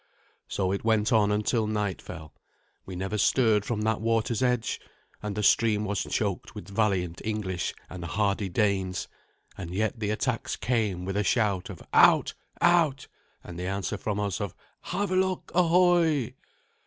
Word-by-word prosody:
So 95 -2 -1
it 100 - -2
went 110 0 +2
on 105 -2 +4
until 105 +2 +1
night 105 -3 -2
fell. 80 -1 -9 0.5
We 95 - -6
never 95 +4 -3
stirred 110 -2 +3
from 110 -3 -2
that 110 -1 0
water's 115 0 0
edge, 125 -3 0 0.4
and 105 -1 -4
the 105 - -2
stream 105 -1 +3
was 105 -2 -1
choked - - -2
with 85 - -8
valiant 100 -5 0
English 105 -5 -2
and 90 -2 -8
hardy 100 +3 0
Danes; 95 -1 0 0.5
and 90 -3 -6
yet 110 +3 -1
the 105 -2 -1
attacks 115 +2 -1
came 105 -7 -1
with 95 - -2
the 105 +1 +1
shout 105 -5 +1
of 95 - -9
"Out! - - +6 0.3
out!" 165 -6 +3 0.4
and 85 -1 -8
the 90 - -3
answer 100 +2 -2
from 105 +1 -3
us 100 0 -2
of 100 -3 -4 0.3
"Havelok, 185 -1 -1
ahoy!" 170 -7 +3
105 Hz, 155 wpm, -27 LUFS, 95-115 Hz, 0.5 s, Out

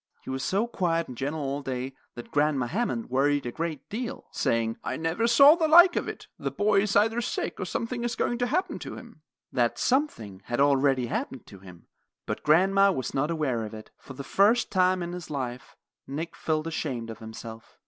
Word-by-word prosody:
He - - -6
was 130 0 -3
so 200 +8 +1
quiet 170 -7 -1
and 125 - -8
gentle 145 +5 -3
all 140 +1 -2
day 130 -1 -4 0.2
that 120 - -9
Grandma 145 -4 +2
Hammond 230 - -2
worried 140 +1 +2
a 120 - -3
great 160 -1 -4
deal, 230 +3 -5
saying: 115 -1 0
"I - - -3
never 165 +8 0
saw 275 +5 +8
the 325 -1 +1
like 345 +3 +8
of - - -1
it. - - -7
The - - -2
boy 205 -1 +2
is 200 -1 -1
either 225 +3 +3
sick 240 - -3
or - - -2
something 235 +1 -3
is 240 -1 -2
going 240 - -1
to 245 - +1
happen 355 +5 -1
to - - -7
him." 235 -9 -13 0.3
That 120 -3 +1
something 115 - -1
had 120 - -3
already 135 -2 +3
happened 125 +1 -4
to 100 - -13
him, 90 -3 -14 0.4
but - - -4
grandma 195 +5 +4
was 130 -8 -3
not 145 +3 0
aware 145 -8 -1
of 110 0 -7
it. 110 - -11
For 135 - -11
the 140 +1 -7
first 215 - +3
time 185 -1 +2
in 175 0 -5
his 180 -2 -7
life, 130 -4 -5 0.3
Nick 160 +5 -5
felt 155 -1 -1
ashamed 130 -8 -3
of 110 - -10
himself. 110 0 -10
155 Hz, 210 wpm, -27 LUFS, 130-215 Hz, 0.4 s, saw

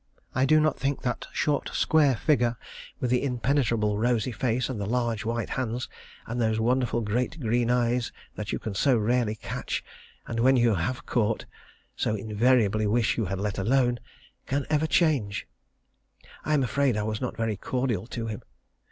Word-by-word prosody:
I 130 +1 +2
do 155 +2 +6
not 155 -2 +1
think 140 +1 -1
that 125 -2 -2
short, 150 -1 0
square 150 -4 +4
figure, 120 -3 +1 0.4
with 125 - -1
the 125 - +3
impenetrable 120 -5 +1
rosy 120 +1 +1
face, 125 +1 0
and 120 -6 -4
the 100 - -2
large 115 -1 -1
white 115 +1 -2
hands, 120 0 -2 0.4
and 120 +2 -3
those 110 -1 +1
wonderful 120 +1 +1
great 120 +9 -1
green 120 -1 +1
eyes 120 -1 +1 0.2
that 105 -1 -5
you - - -1
can 110 - -5
so 125 +6 +3
rarely 115 0 +1
catch, - - -4 0.4
and 115 - -4
when 130 +3 +5
you 120 -2 +4
have 100 +8 -2
caught, 115 -2 0 0.5
so 110 - 0
invariably 110 0 +2
wish 115 +2 +2
you 115 - 0
had 95 +1 -3
let 100 0 -2
alone, 120 +3 +2 0.5
can 140 0 -1
ever 155 +1 +2
change. 140 - +1 1.0
I 155 - +1
am 140 - +2
afraid 130 -2 +1
I 105 - 0
was 110 0 -3
not 125 - -3
very 115 -2 0
cordial 120 -1 -2
to 115 -2 -4
him. 110 -2 -5
120 Hz, 175 wpm, -27 LUFS, 110-130 Hz, 1.0 s, do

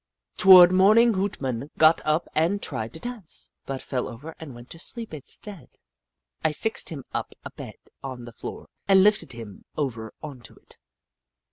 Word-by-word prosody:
Toward 185 -2 +9
morning 215 +5 +5
Hoot 195 +1 -2
Mon 130 +1 -3
got 160 +1 +6
up 155 +2 0
and 170 +6 +1
tried 115 - -2
to - - -8
dance, 240 -6 -6 0.2
but 135 -1 -4
fell 125 -2 -2
over 145 +8 -9
and 145 -6 -9
went 120 +1 -13
to 165 - -9
sleep 230 +2 -5
instead. 170 +5 -7 0.7
I 160 -1 +2
fixed 220 +8 -2
him 145 -5 -7
up - - -4
a - - -6
bed - - -9 0.3
on 130 -3 -7
the 120 - -11
floor - - -8 0.2
and 190 -1 +6
lifted 210 -9 +2
him 115 -4 -10
over 115 -7 -3
on 145 -4 -7
to 115 - -12
it. - - -15
155 Hz, 175 wpm, -25 LUFS, 130-190 Hz, 0.7 s, Toward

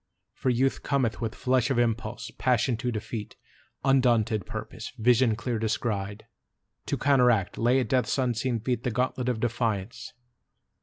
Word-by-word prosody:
For 130 - -1
Youth 130 +2 +1
cometh 125 -7 0
With 110 -2 -3
flush 130 0 +1
of 135 - +1
impulse, 115 0 -1
passion 125 -1 +2
to 125 +1 -2
defeat, 105 0 -5 0.5
Undaunted 120 -6 +2
purpose, - - -6
vision 120 0 +4
clear 115 0 -3
descried, 105 -2 -2 0.6
To - - -1
counteract, 125 -8 +3
lay 120 +3 +3
at 130 - -2
Death's 130 +1 +1
unseen 120 -2 0
feet 125 0 -1
The - - 0
gauntlet 125 +1 -1
of 120 -3 -1
defiance. 115 -3 -2
120 Hz, 145 wpm, -27 LUFS, 110-125 Hz, 0.6 s, vision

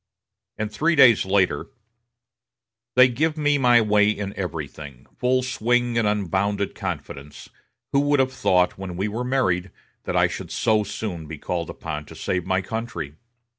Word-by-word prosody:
And 110 0 -3
three 160 +10 +1
days 120 -9 +6
later: 95 -1 +1 1.3
"They 130 0 +8
give 155 +6 -1
me 145 -1 +2
my 120 -2 +5
way 105 -1 +3
in 105 -2 -3
everything, 75 -7 -6
full 130 +1 +2
swing 120 -1 0
and 115 -2 +2
unbounded 100 0 0
confidence.... 70 +2 -7 0.4
Who 140 - +3
would 145 0 +2
have 130 0 +1
thought, 90 -7 +2
when 90 -2 -6
we 95 +3 -1
were 110 +4 -3
married, 110 -9 0 0.4
that - - -1
I - - +5
should - - -7
so 110 -2 +1
soon 100 -5 -5
be 80 0 -7
called 85 +2 -3
upon 75 0 -6
to - - -13
save 90 -2 -2
my 95 0 +1
country?" 100 -9 -5
105 Hz, 160 wpm, -23 LUFS, 90-125 Hz, 1.3 s, They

